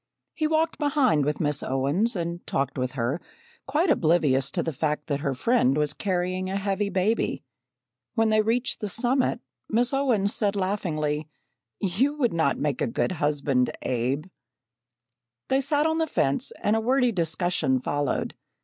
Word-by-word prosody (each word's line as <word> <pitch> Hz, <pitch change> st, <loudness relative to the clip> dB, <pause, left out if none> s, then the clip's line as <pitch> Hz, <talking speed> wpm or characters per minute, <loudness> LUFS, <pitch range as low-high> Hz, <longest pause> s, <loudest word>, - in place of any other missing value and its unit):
He 310 Hz, -, 0 dB
walked 315 Hz, +1 st, 0 dB
behind 275 Hz, -, +2 dB
with 150 Hz, 0 st, -1 dB
Miss 145 Hz, -2 st, 0 dB
Owens, 145 Hz, -, 0 dB
and 170 Hz, 0 st, -3 dB
talked 135 Hz, -1 st, -1 dB
with 130 Hz, -1 st, -2 dB
her, 130 Hz, +4 st, -1 dB, 0.5 s
quite 300 Hz, +5 st, +2 dB
oblivious 155 Hz, -, +2 dB
to 170 Hz, +3 st, -1 dB
the 165 Hz, -, -3 dB
fact 150 Hz, +2 st, -1 dB
that 145 Hz, -3 st, -2 dB
her 140 Hz, -3 st, -2 dB
friend 150 Hz, -, +2 dB
was 150 Hz, -1 st, +1 dB
carrying 185 Hz, -1 st, -2 dB
a 190 Hz, -, -2 dB
heavy 200 Hz, +1 st, -1 dB
baby. 200 Hz, +4 st, 0 dB, 0.7 s
When 225 Hz, 0 st, +3 dB
they 215 Hz, 0 st, +4 dB
reached 235 Hz, +3 st, 0 dB
the 210 Hz, -, -3 dB
summit, 245 Hz, +4 st, +1 dB, 0.3 s
Miss 240 Hz, +4 st, +1 dB
Owens 235 Hz, -8 st, +1 dB
said 205 Hz, -2 st, 0 dB
laughingly: 155 Hz, -6 st, -1 dB, 0.5 s
"You 220 Hz, +10 st, +1 dB
would 250 Hz, -, +1 dB
not 160 Hz, -4 st, +1 dB
make 145 Hz, -3 st, -1 dB
a -, -, +2 dB
good 115 Hz, -, -1 dB
husband, 145 Hz, -5 st, 0 dB
Abe." 130 Hz, +4 st, -1 dB, 1.2 s
They 265 Hz, +1 st, +3 dB
sat 290 Hz, +2 st, +2 dB
on 320 Hz, 0 st, +1 dB
the 320 Hz, -, +1 dB
fence 140 Hz, -, +1 dB
and 210 Hz, -, +3 dB
a 225 Hz, -, +1 dB
wordy 250 Hz, +1 st, +2 dB
discussion 170 Hz, -, 0 dB
followed. 145 Hz, +2 st, -1 dB
185 Hz, 160 wpm, -26 LUFS, 145-235 Hz, 1.2 s, they